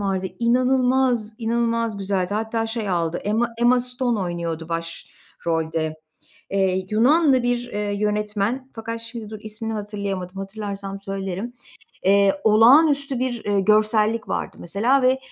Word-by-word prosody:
vardı, 190 -2 -1
inanılmaz, 250 -1 +2
inanılmaz 230 -2 0
güzeldi. 195 -1 -1
Hatta 225 +1 -1
şey 225 -2 -3
aldı, 170 -2 0
Emma 225 +3 +1
Emma 245 +1 +4
Stone 250 -2 0
oynuyordu 170 -3 -4
başrolde. 165 -1 -4 0.5
Eee, 190 -1 +1
Yunanlı 265 +4 +4
bir, 245 0 +1
eee, 205 0 -2
yönetmen 210 +4 -1
fakat 230 0 -5
şimdi 230 -2 -7
dur, 215 - -7
ismini 220 +1 -5
hatırlayamadım, 200 -3 -4
hatırlarsam 195 0 -6
söylerim. 195 +3 -4 0.5
Eee, 200 +6 +4
olağanüstü 275 +5 +5
bir, 245 -2 -2
eee, 205 -1 +1
görsellik 215 +2 +2
vardı - - -3
mesela 230 +10 +1
ve, 255 +1 +3
215 Hz, 125 wpm, -22 LUFS, 195-240 Hz, 0.5 s, olağanüstü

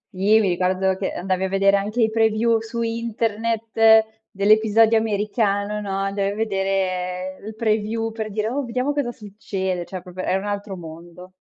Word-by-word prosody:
Sì, 205 +4 +4
mi 205 -3 +2
ricordo 185 +1 +1
che 190 0 -3
andavi 185 +1 -2
a - - -2
vedere 195 +1 +3
anche 205 +4 -2
i 220 - +2
preview 225 +1 +2
su 230 +1 -4
internet 225 -1 +2 0.2
dell'episodio 220 +2 +4
americano, 210 -1 -1
no, 205 - -6
andavi 195 0 -1
a - - -8
vedere 190 -3 -2
il 220 - -7
preview 220 0 -1
per 220 -1 -5
dire: 215 +1 -2
"Oh, 280 +4 -2
vediamo 250 +4 -1
cosa 285 -4 -1
succede." 190 -4 -4
cioè 185 -1 -7
proprio 185 0 -7
era 190 - +2
un 195 - -5
altro 205 -1 -4
mondo. 170 +2 -11
210 Hz, 170 wpm, -22 LUFS, 190-225 Hz, 0.2 s, Sì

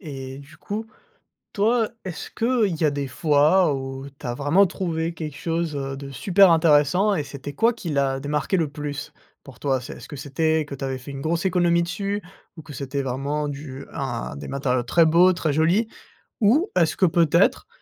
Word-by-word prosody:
Et 135 -6 -7
du 145 +3 -14
coup, 215 +2 -5 0.7
toi, 225 +2 +2 0.2
est-ce 175 - -6
qu'il 225 -6 +1
y 155 - +4
a - - +3
des 140 -1 -3
fois 150 +3 +3
où 135 0 -5
tu - - -8
as 120 - -1
vraiment 145 +10 +3
trouvé 170 -3 -2
quelque 155 -3 -6
chose, 165 -2 -2
heu, 135 -1 -3
de 140 0 -8
super 190 - +4
intéressant? 165 +5 +4
Et 155 - 0
c'était 140 0 -8
quoi 230 +10 +2
qui 185 -8 -6
l'a 140 -2 +1
démarqué 150 +7 -1
le 160 -4 0
plus 145 -1 -5 0.3
pour 130 -4 -14
toi? 135 -3 0
C'est - - -8
est-ce - - -12
que 145 - -8
c'était 155 +3 0
que 145 -1 -8
tu 135 - -9
avais 130 - -2
fait 130 +2 -10
une 135 - -6
grosse 165 +4 -1
économie 175 -2 +3
dessus? 200 +4 -3 0.3
Ou 160 - -9
que 145 - -11
c'était 140 +1 -3
vraiment 140 +3 -2
du 140 -1 -7
un 120 - -4
des 70 - -8
matériaux 130 -3 -1
très 165 +7 +4
beaux, 175 +3 +5
très 160 -3 -1
jolis? 170 +9 +2 0.5
Ou 275 - +4
est-ce 165 -3 +2
que 185 - +4
peut-être 170 +1 +3
155 Hz, 200 wpm, -23 LUFS, 140-175 Hz, 0.7 s, beaux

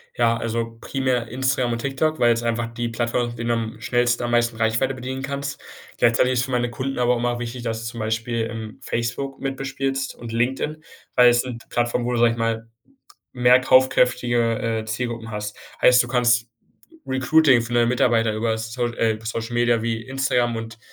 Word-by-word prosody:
Ja, 115 -1 +2
also 115 0 -3
primär 130 -3 -1
Instagram 130 -1 0
und 115 - -3
TikTok, 140 +5 -1
weil 120 -1 +5
es 115 - -3
einfach 115 0 -2
die 120 0 -2
Plattformen 120 +1 -1
mit 120 - -9
denen 120 0 -2
du - - +3 0.2
am 110 - -17
schnellsten 120 +2 +1
am 120 - -2
meisten 120 -1 +1
Reichweite 110 +4 +1
bedienen 130 +1 -5
kannst. 140 +1 -4 0.4
Gleichzeitig 120 +2 +3
ist 125 - +1
es 125 - +1
für 135 - -7
meine 120 -1 0
Kunden 135 +3 -4
aber 125 0 +3
immer 120 0 -1
wichtig, 120 0 -5
dass 115 -1 -3
du 115 - -4
zum 115 - -8
Beispiel, 115 +1 -1
ähm, 110 -2 -7
Facebook 130 +4 -3
mit 135 0 -3
bespielst 135 0 -3
und 115 -1 -8
LinkedIn, 130 +6 -1 0.3
weil 125 -1 +7
es 120 0 +3
sind 125 -3 -7
Plattformen, 120 0 0
wo 125 - -1
du, - - 0
sage 120 0 +5
ich 115 - -5
mal, 115 0 -1 0.7
mehr 125 0 +5
kaufkräftige, 120 -3 +2
äh, - - -10
Zielgruppen 115 0 -4
hast. 105 -1 -5 0.3
Heißt, 125 0 +7
du 120 - -8
kannst 120 -2 +2 0.6
Recruiting 130 0 +4
für 120 +1 -7
neue 120 0 +3
Mitarbeiter 115 -2 +2
über 110 +1 0
So 115 +2 -2
äh, 115 -2 0
Social 115 +1 -4
Media 120 -1 +2
wie 115 -1 -2
Instagram 125 -2 0
und 115 0 -7
120 Hz, 200 wpm, -22 LUFS, 115-125 Hz, 0.7 s, weil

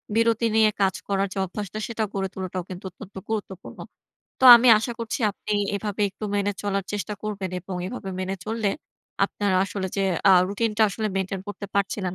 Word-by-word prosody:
বিরতি 230 0 +2
নিয়ে 220 -1 +5
কাজ 195 -1 +2
করার 195 0 +1
যে - - -9
অভ্যাসটা 205 +2 -6
সেটা 225 -2 -2
গড়ে 195 -1 -2
তোলাটাও 185 -1 -4
কিন্তু 185 -1 -8
অত্যন্ত 195 +2 -13
গুরুত্বপূর্ণ। 200 -4 -5 0.6
তো - - +2
আমি 240 +2 +4
আশা 230 +3 -3
করছি 230 +2 -3
আপনি 210 +1 -6 0.2
এভাবে 205 0 -2
একটু 200 +3 -8
মেনে 205 0 +1
চলার 200 -1 -1
চেষ্টা 205 -1 -3
করবেন 200 -3 -4
এবং 185 +1 -6
এভাবে 195 -2 -6
মেনে 190 +1 -2
চললে 220 -1 -1 0.6
আপনার 205 -2 -1
আসলে 195 -1 -4
যে, - - +1 0.3
আ - - +8 0.2
রুটিনটা 215 +2 0
আসলে 215 +2 -3
মেইনটেইন 190 0 -2
করতে 205 0 -6
পারছিলেন 195 -2 -1
200 Hz, 180 wpm, -24 LUFS, 190-215 Hz, 0.6 s, আ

